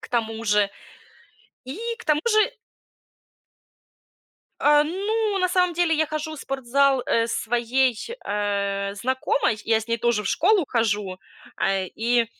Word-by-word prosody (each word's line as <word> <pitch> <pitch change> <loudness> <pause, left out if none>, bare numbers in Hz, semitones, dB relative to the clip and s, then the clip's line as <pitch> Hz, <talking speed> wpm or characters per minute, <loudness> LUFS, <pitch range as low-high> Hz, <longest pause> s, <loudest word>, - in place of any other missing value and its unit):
К - - -11
тому 225 -1 -2
же 210 -1 +3 1.0
и 260 +8 -7 0.2
к - - -11
тому 300 -1 +2
же 430 +1 +3 2.1
Э, 295 0 +5
ну, 405 +5 -1
на 365 -1 +2
самом 360 -1 +2
деле, 340 -1 +2
я 315 +1 +1
хожу 310 +1 -4
в - - -10
спортзал, 270 0 +1
э, 230 0 +2
своей, 240 +2 +1 0.3
э, 200 -1 -1
знакомой, 255 0 0
я 225 -1 +2
с 220 - -10
ней 230 - +1
тоже 235 -2 +1
в 195 - -3
школу 375 +2 +3
хожу, 205 -5 -1 0.4
а, 195 0 +1
и 230 +5 0
245 Hz, 140 wpm, -24 LUFS, 220-315 Hz, 2.1 s, Э